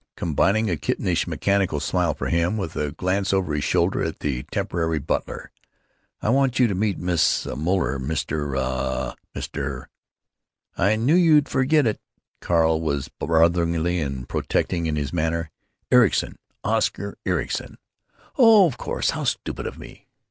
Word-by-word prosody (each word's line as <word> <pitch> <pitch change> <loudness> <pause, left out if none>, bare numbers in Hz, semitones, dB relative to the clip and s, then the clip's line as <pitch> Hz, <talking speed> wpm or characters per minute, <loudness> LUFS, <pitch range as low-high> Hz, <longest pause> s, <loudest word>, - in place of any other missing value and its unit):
combining 95 +7 +1
a 85 -5 0
kittenish - - -1
mechanical 100 -6 0
smile 85 +1 0
for - - -5
him 85 +5 +1
with 95 -6 -4
a 75 -1 -2
glance 95 +4 -1
over 95 -5 0
his 75 - -1
shoulder - - +1
at - - -4
the 65 -4 -1
temporary 85 -5 -1
butler. 75 +1 -3 0.7
"I - - +1
want 135 0 +2
you 125 - +5
to 110 - 0
meet 100 +1 0
Miss 90 -2 +1
Moeller, 75 -1 -1
Mr.—uh—Mr——" 65 -2 -3 0.9
"I 100 +4 +2
knew 120 +8 +2
you'd 160 -5 +5
forget 145 +2 +2
it!" 110 - -1 0.4
Carl 80 -2 +2
was 70 -4 -2
brotherly 85 +2 +1
and 70 -4 -4
protecting 85 -2 -1
in 80 - -1
his 75 0 -3
manner. 80 -1 -1 0.4
"Ericson, 125 -1 +3 0.2
Oscar - - -1
Ericson." - - -2 0.6
"Oh, 225 -5 +8
of 135 -8 -2
course. - - -1
How - - -4
stupid - - -2
of - - -7
me! - - -13
85 Hz, 140 wpm, -23 LUFS, 75-100 Hz, 0.9 s, Oh